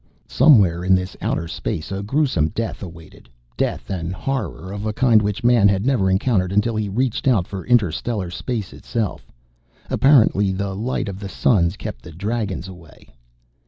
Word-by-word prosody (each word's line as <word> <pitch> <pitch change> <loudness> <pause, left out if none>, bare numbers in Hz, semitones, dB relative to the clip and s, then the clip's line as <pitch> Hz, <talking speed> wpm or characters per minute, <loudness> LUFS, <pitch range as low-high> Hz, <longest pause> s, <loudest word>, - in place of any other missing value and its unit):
Somewhere 95 - +4
in 95 +1 +4
this 90 0 -3
outer 85 - -1
space, 80 +1 -4
a 95 0 -3
gruesome 110 - +1
death 115 +8 -4
awaited, 80 -8 -12 0.3
death - - -2
and 85 -2 -3
horror 135 -8 -4
of 105 +1 -4
a 105 - -2
kind 115 -2 +4
which 105 +1 -2
Man 120 -4 +5
had 100 +1 +1
never 120 -8 +2
encountered 95 -1 +1
until 105 +3 +1
he 105 -1 -1
reached 125 +5 -1
out 110 -9 +3
for 95 -1 -7
inter 115 -8 +3
stellar 100 -2 -3
space 110 +1 -4
itself. 110 -8 -4 0.6
Apparently 110 -8 +4
the 100 +1 -3
light 120 +3 -2
of 100 -1 -6
the 100 -2 -6
suns 95 -4 +2
kept 105 -1 -7
the 85 - -11
Dragons 100 +1 -3
away. 90 -9 -15
100 Hz, 170 wpm, -21 LUFS, 95-115 Hz, 0.6 s, Man